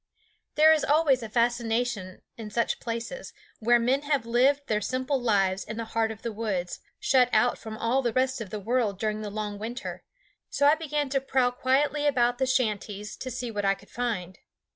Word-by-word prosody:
There 315 +1 +7
is 310 - +1
always 290 -3 +3
a 225 - -6
fascination 235 -4 -1
in 220 -2 -8
such 235 +2 -1
places, 235 - -5 0.3
where 240 +2 +4
men 250 +4 +1
have 285 -5 0
lived 265 +5 +2
their 210 -4 0
simple 260 +3 -1
lives 195 -5 +1
in 220 +1 -7
the 230 - -3
heart 225 -1 +2
of 220 -1 -8
the 235 - -2
woods, 200 -5 -3 0.2
shut 260 - +3
out 220 +3 +2
from 220 -1 -7
all 235 +4 +1
the 240 -3 0
rest 260 +1 0
of 210 - -6
the 215 - -5
world 220 -1 0
during 215 0 -1
the 210 - -4
long 205 0 -4
winter; 240 +5 -6 0.5
so 285 - +1
I 290 - +7
began 300 -3 -2
to 270 0 0
prowl 260 -2 +1
quietly 285 +4 +1
about 245 -3 +2
the 265 - +1
shanties 210 -5 -1
to 260 - -6
see 245 -1 -4
what 205 -2 -3
I 195 0 +3
could - - -20
find. 210 -7 -3
240 Hz, 200 wpm, -27 LUFS, 215-265 Hz, 0.5 s, There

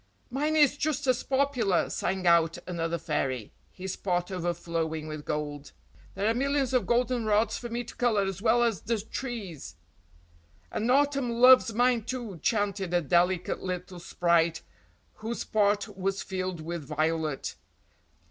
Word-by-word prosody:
"Mine 300 +4 0
is 290 -2 +4
just 295 -1 -1
as 255 -2 +2
popular," 265 -9 +1
sang 190 -1 -2
out 170 -1 +4
another 170 -1 -2
fairy, 135 -8 -2 0.2
his 190 0 -5
pot 180 -1 -1
overflowing 165 -3 -2
with 155 -1 -6
gold. 145 -2 -4 0.4
"There 200 +2 0
are 225 - +3
millions 275 +1 0
of 255 - +2
goldenrods 235 -3 +2
for 240 - -6
me 240 +1 -3
to 240 - -11
colour 230 -5 +2
as 195 -1 -4
well 240 +1 +4
as 225 -8 0
the 230 -1 -1
trees!" 200 - -6 1.0
"And 225 - -1
autumn 275 -1 +2
loves 250 0 +6
mine 245 0 +3
too," 235 -9 -5
chanted 200 -4 0
a 175 - +3
delicate 175 +3 +1
little 180 0 -5
sprite 170 -1 +1 0.5
whose 225 +2 -4
pot 205 -1 +1
was 195 +1 -2
filled 185 -3 -4
with 170 0 -5
violet. 155 0 -1
195 Hz, 145 wpm, -28 LUFS, 170-240 Hz, 1.0 s, loves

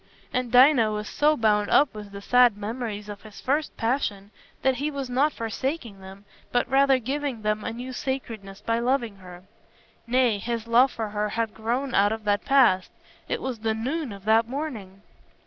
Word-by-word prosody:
And 250 -2 -1
Dinah 250 -3 +6
was 210 0 -4
so 300 +1 +2
bound 210 -2 +2
up 285 -3 +4
with 210 -1 -9
the 200 0 -9
sad 245 -3 +4
memories 210 -1 -5
of 205 -1 -8
his 215 -2 -13
first 295 +4 -1
passion 215 -5 -2 0.3
that 265 -1 +2
he 290 +4 -1
was 275 -3 -5
not 280 +5 +2
forsaking 230 -2 -4
them, 190 +1 -12 0.3
but 245 0 +1
rather 270 +1 +4
giving 265 -1 -3
them 215 0 0
a - - -3
new 250 +3 -7
sacredness 225 -7 -5
by 230 0 0
loving 235 -4 0
her. 180 -1 -12 0.6
Nay, 245 -3 +2
his 230 +1 -3
love 245 +3 +4
for 220 -2 -4
her 210 0 -2
had 225 0 -2
grown 240 +4 -2
out 205 +1 +4
of 220 0 -4
that 205 -1 +1
past: 255 -10 +4 0.4
it - - -2
was 255 -4 -4
the 220 0 -1
noon 270 +4 -3
of 200 0 -11
that 225 +1 +4
morning. 230 -9 -6
230 Hz, 185 wpm, -25 LUFS, 210-260 Hz, 0.6 s, Dinah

